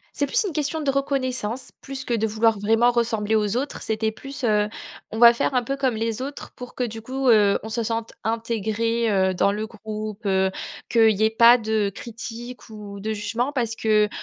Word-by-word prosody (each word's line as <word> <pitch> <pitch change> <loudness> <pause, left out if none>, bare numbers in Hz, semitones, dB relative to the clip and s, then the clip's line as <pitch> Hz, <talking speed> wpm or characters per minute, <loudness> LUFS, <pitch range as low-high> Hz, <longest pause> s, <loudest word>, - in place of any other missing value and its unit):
C'est 285 - +1
plus 350 - +1
une 375 - -2
question 300 +1 -2
de 285 -2 +1
reconnaissance, 260 -4 -2
plus 270 -1 -6
que 240 - -1
de 220 0 +1
vouloir 220 0 +2
vraiment 225 +4 +3
ressembler 225 -2 0
aux 210 +1 0
autres. 275 +3 -3
C'était 220 0 -1
plus, 275 +5 -9
heu, 210 -2 +2 0.4
on 220 - -4
va 235 0 +9
faire 250 +3 -1
un 250 - +3
peu 275 +3 -3
comme 260 -4 0
les 225 +1 -2
autres, 280 +2 -6
pour 250 0 -9
que 250 - -3
du 225 -2 -3
coup, 260 +3 -2
heu, 210 -3 +5
on 220 - -7
se 230 +1 -2
sente 230 0 -3
intégré, 230 0 -1
heu, 190 -2 +2
dans 200 +2 +2
le 215 +1 -3
groupe, 215 -1 -7
heu, 190 0 +2 0.4
qu'il 225 -2 +5
y 210 +2 -2
ait 220 - +4
pas 235 +2 +7
de 215 -2 0
critiques 240 +1 -8
ou 205 -2 -9
de 220 +2 -3
jugement, 225 +6 -2
parce 235 -4 -1
que, 215 -1 +3
225 Hz, 210 wpm, -23 LUFS, 215-245 Hz, 0.4 s, va